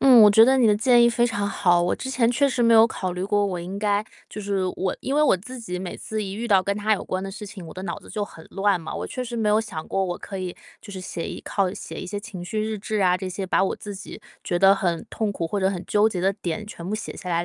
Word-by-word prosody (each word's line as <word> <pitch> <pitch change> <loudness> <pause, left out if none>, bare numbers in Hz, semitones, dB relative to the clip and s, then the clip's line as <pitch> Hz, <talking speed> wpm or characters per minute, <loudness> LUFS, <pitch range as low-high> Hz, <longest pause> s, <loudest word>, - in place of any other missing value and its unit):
嗯， 255 -4 +8
我 210 - +9
觉 220 +2 +8
得 265 +2 +4
你 240 - +5
的 210 -1 +4
建 240 +1 +5
议 235 - +6
非 235 0 +2
常 205 -3 -1
好。 175 -4 +3
我 175 - +1
之 265 - -5
前 240 -2 +2
确 280 +3 +3
实 250 -2 0
没 230 0 +5
有 225 0 +8
考 185 -5 -4
虑 180 +1 -3
过， 205 0 +2
我 185 -2 -3
应 190 +3 -6
该 205 0 +1 0.2
就 - - -9
是 200 -1 -1
我 190 0 -1
因 270 - -2
为 300 - +4
我 290 - +4
自 250 +8 -9
己 180 -6 -5
每 185 -1 -5
次 215 0 -4
一 195 -1 -5
遇 235 +3 -4
到 190 -2 +5
跟 200 +1 -1
他 215 +1 +1
有 205 - 0
关 185 0 -3
的 195 - -5
事 210 +1 -8
情， 190 -2 -9
我 - - -9
的 185 - -7
脑 170 - -4
子 - - -15
就 210 - -2
很 160 -5 -13
乱 195 -1 +1
嘛， 160 - -7
我 - - -4
确 255 - -4
实 240 0 -5
没 220 -2 +1
有 210 - +4
想 185 -8 -6
过， 195 0 0
我 175 -1 -3
可 195 - -7
以 185 -2 -4 0.3
就 200 - -11
是 190 - -6
写 180 -2 -5
一 - - -6
靠 195 -3 -1
写 - - -8
一 - - -6
些 205 +2 -4
情 195 -4 -8
绪 215 +4 -2
日 215 0 -2
志 215 +1 -2
啊 180 -1 +4
这 185 0 -5
些， 190 +1 -4
把 185 - +2
我 - - -1
自 205 -1 -7
己 195 +2 -9 0.2
觉 175 - -1
得 195 +1 +7
很 175 +1 -1
痛 215 -1 -2
苦 165 -3 -3
或 205 - -2
者 190 +1 +2
很 180 -2 -4
纠 210 +1 +3
结 185 -5 -3
的 190 +1 +3
点 205 +2 -4
全 170 -5 -8
部 200 - -2
写 215 - -6
下 180 - -6
来， 170 0 +1
200 Hz, 335 characters per minute, -24 LUFS, 185-220 Hz, 0.3 s, 我